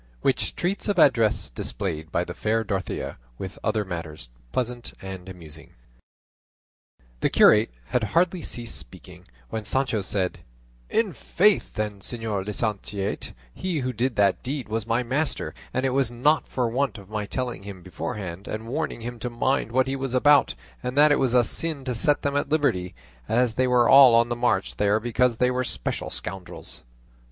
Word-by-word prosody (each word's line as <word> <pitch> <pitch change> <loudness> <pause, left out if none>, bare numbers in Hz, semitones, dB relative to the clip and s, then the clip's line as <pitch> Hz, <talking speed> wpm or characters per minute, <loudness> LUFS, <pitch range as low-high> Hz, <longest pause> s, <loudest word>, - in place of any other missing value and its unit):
WHICH - - 0
TREATS 190 +5 -2
OF 205 - 0
ADDRESS 110 - +4
DISPLAYED 80 +2 -4
BY 85 - +1
THE 85 - -6
FAIR 110 +4 0
DOROTHEA, 95 -3 -3 0.2
WITH 95 0 -7
OTHER 110 -1 0
MATTERS 80 -8 -6 0.2
PLEASANT 120 -1 -3
AND 95 -1 -8
AMUSING 80 -4 -12 1.5
The - - +2
curate 105 +2 +6 0.2
had 125 -3 +1
hardly 170 - +1
ceased 120 -5 -4
speaking, - - -11 0.3
when 110 -1 -3
Sancho 120 0 +1
said, 95 -2 -1 0.5
"In 220 -5 +1
faith, 195 +8 +2
then, 105 -2 -3
señor 110 -2 -2
licentiate, 105 -2 -3 0.2
he 175 -6 -2
who 130 0 -2
did 120 +2 -1
that 100 -2 +3
deed 135 0 -4
was 110 0 -2
my 115 +2 +1
master; 135 +5 -1 0.2
and 130 +1 -1
it 135 - +1
was 135 -2 +2
not 135 +6 +2
for 125 -2 -1
want 125 -1 -1
of 100 -2 -12
my 105 0 -4
telling 125 -5 -3
him 100 -2 -9
beforehand 90 +1 -6
and 110 +1 -4
warning 145 -1 -3
him 120 +1 -6
to 125 - -3
mind 120 +1 0
what 130 +2 +2
he 135 - -1
was 135 -2 -3
about, 145 +2 +5 0.3
and 125 +2 -4
that 150 +1 +7
it 145 - +4
was 130 -2 +2
a 125 - +6
sin 155 +4 -3
to 125 - -1
set 145 +5 +1
them 140 0 0
at 145 - 0
liberty, 95 - +1 0.3
as 120 0 +2
they 130 +2 +1
were 125 -1 +4
all 135 -4 +9
on 115 +1 +4
the 120 - -1
march 120 -5 0
there 105 +1 +3
because 120 +1 +1
they 125 +1 +3
were 125 0 0
special - - -3
scoundrels." 90 +9 -7
115 Hz, 180 wpm, -25 LUFS, 100-130 Hz, 1.5 s, all